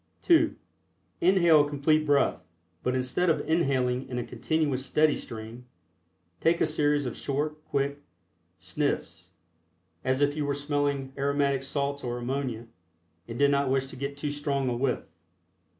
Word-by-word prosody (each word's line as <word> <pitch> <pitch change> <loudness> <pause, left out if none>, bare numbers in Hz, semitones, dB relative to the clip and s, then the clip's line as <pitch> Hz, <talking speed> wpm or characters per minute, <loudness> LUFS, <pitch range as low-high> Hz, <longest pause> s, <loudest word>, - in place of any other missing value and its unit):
(2) 335 -2 +4 0.7
Inhale 170 -4 +5
a 145 - -4
Complete 155 +2 +2
Breath, 145 -1 +2 0.4
but 125 +1 0
instead 130 +8 0
of 160 - 0
inhaling 130 -6 +1
in 125 - -4
a 120 - -1
continuous 150 -5 -1
steady 150 +2 +3
stream, 115 +2 -8 0.7
take 165 +1 +2
a - - +4
series 150 -2 +1
of 125 - -4
short, 150 +2 -3
quick 140 0 -1 0.6
"sniffs," - - -3 0.7
as 130 0 +1
if 145 0 +2
you 155 - -1
were 140 -1 -1
smelling 145 -2 -1
aromatic 140 -1 +1
salts 140 +1 -2
or 120 -1 -3
ammonia 125 -2 -3 0.6
and 115 0 -6
did 140 +1 +4
not 140 -1 +2
wish 135 0 +1
to 135 - -10
get 140 +2 -5
too 145 0 -2
strong 140 -2 -1
a 120 - -1
"whiff." 125 +1 0
140 Hz, 150 wpm, -28 LUFS, 130-150 Hz, 0.7 s, Inhale